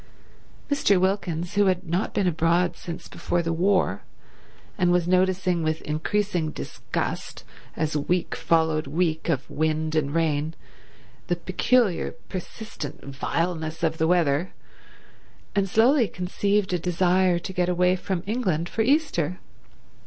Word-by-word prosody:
Mr. 280 -10 +3
Wilkins, 180 -3 -1
who 205 -1 +3
had 185 -2 0
not 175 +5 0
been 200 - 0
abroad 170 +1 +2
since 170 -1 -8
before 175 0 -2
the 165 0 -1
war, 185 +3 +2 0.7
and 175 -3 +2
was 175 -1 +2
noticing 185 -1 +2
with 155 0 0
increasing 170 +2 -1
disgust, - - -4 0.3
as 155 -1 -1
week 175 +4 0
followed 160 -2 +1
week 160 +2 0
of 140 -5 0
wind 155 0 -1
and 150 -1 0
rain, 160 -1 0 0.7
the 175 - +1
peculiar 185 +3 +1 0.2
persistent 185 -4 -7
vileness 160 +2 -2
of 160 -1 0
the 160 - +3
weather, 165 -1 +2 1.0
and 195 -1 +1
slowly 240 +4 +4
conceived 195 +2 0
a 180 - +1
desire 180 +1 +2
to 180 +2 -6
get 180 -1 +1
away 180 +1 +3
from 185 -1 -3
England 190 -7 0
for 220 - -2
Easter. 220 - +1
175 Hz, 130 wpm, -25 LUFS, 160-190 Hz, 1.0 s, slowly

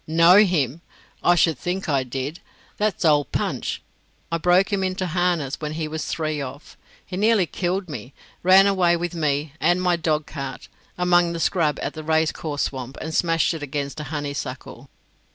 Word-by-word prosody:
"Know 165 +4 +6
him? 170 - +2 0.4
I 175 - +5
should 165 -5 +2
think 185 +2 -3
I 140 -3 +2
did. 135 +5 -5 0.4
That's 210 -4 0
old 150 -2 +3
Punch. - - -2 0.5
I 165 - 0
broke 180 +4 +3
him 195 -1 +1
into 185 0 -1
harness 175 -5 -1
when 150 0 -3
he 155 0 -3
was 155 0 -4
three 155 -2 -2
off. 140 +3 -8 0.3
He 185 - -7
nearly 210 -2 +3
killed 180 +4 -2
me; 140 -3 -8 0.3
ran 190 +2 +7
away 180 -3 +3
with 175 0 -3
me 150 -3 -1
and 175 +1 +3
my 180 -1 +2
dog 155 -2 0
cart 140 -3 -7 0.3
among 175 -1 +3
the 170 - -4
scrub 160 -4 +1
at 145 - -3
the 155 - -7
racecourse 155 -1 0
swamp, 130 0 -5
and 160 0 -5
smashed 165 0 +2
it 160 - -6
against 145 +1 -4
a 150 - -5
honeysuckle." 145 0 -6
160 Hz, 175 wpm, -23 LUFS, 145-180 Hz, 0.5 s, ran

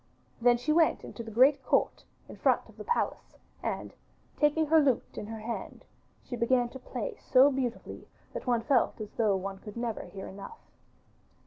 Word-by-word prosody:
Then 240 0 +5
she 290 +6 0
went 325 0 +3
into - - -8
the 225 - -8
great 260 +6 +4
court - - +1 0.2
in - - -10
front - - +2
of - - -17
the - - -7
palace, 475 - -2 0.2
and - - -4 0.4
taking 295 +2 +2
her 320 +1 +5
lute 275 -5 +1
in 210 - -6
her 220 0 -7
hand, 230 +2 -6 0.4
she 245 - -6
began 240 +1 +2
to 265 - -10
play 450 - -5
so 265 +2 +7
beautifully 255 -3 -4 0.3
that - - -6
one 240 -2 +2
felt 260 -3 +2
as 210 -1 -6
though 215 -4 +2
one 195 +1 -4
could 210 +2 -10
never 235 -2 -2
hear 195 -1 -8
enough. 200 - -9
245 Hz, 185 wpm, -29 LUFS, 225-280 Hz, 0.4 s, so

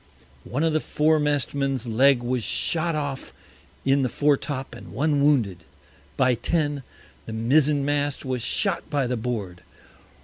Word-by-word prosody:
One 140 +6 -2
of 165 -1 +2
the 155 - +3
Foremast 150 -2 +1
Men's 135 -3 -1
Leg 120 +2 +3
was 125 -1 -1
shot 165 +6 0
off 145 -3 -4 0.5
in 135 +1 +3
the 130 - 0
Fore 145 +2 +3
top, 135 -1 -5
and - - -11
one 145 0 +1
wounded. 110 - +2 0.5
By 130 -1 +3
Ten, 145 +3 -1 0.5
the 110 - -5
Mizen 140 +5 +2
mast 145 0 -1
was 130 -2 -2
shot - - -1
by 145 -2 0
the 125 0 -1
Board. 110 -7 -4
140 Hz, 150 wpm, -24 LUFS, 125-145 Hz, 0.5 s, the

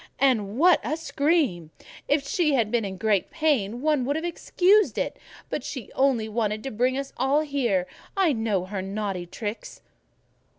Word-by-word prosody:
"And 230 -6 +1
what 350 +4 +6
a 310 - -2
scream! 285 - 0 0.4
If 285 -1 +1
she 305 -2 +2
had 225 -4 +1
been 240 -2 +1
in 190 -2 -5
great 210 -2 +1
pain 255 -9 0
one 300 -4 +2
would 285 +3 0
have 320 +2 -2
excused 375 +4 +2
it, - - -1 0.3
but - - -4
she 250 -7 -7
only 260 -5 +2
wanted 215 -1 -2
to 270 - -4
bring 250 +4 +1
us 275 0 -5
all 270 +4 +2
here: 250 -11 0 0.3
I 365 -6 +3
know 220 -6 -1
her 190 0 -4
naughty 195 -2 -4
tricks." 210 +4 -6
250 Hz, 170 wpm, -25 LUFS, 210-295 Hz, 0.4 s, what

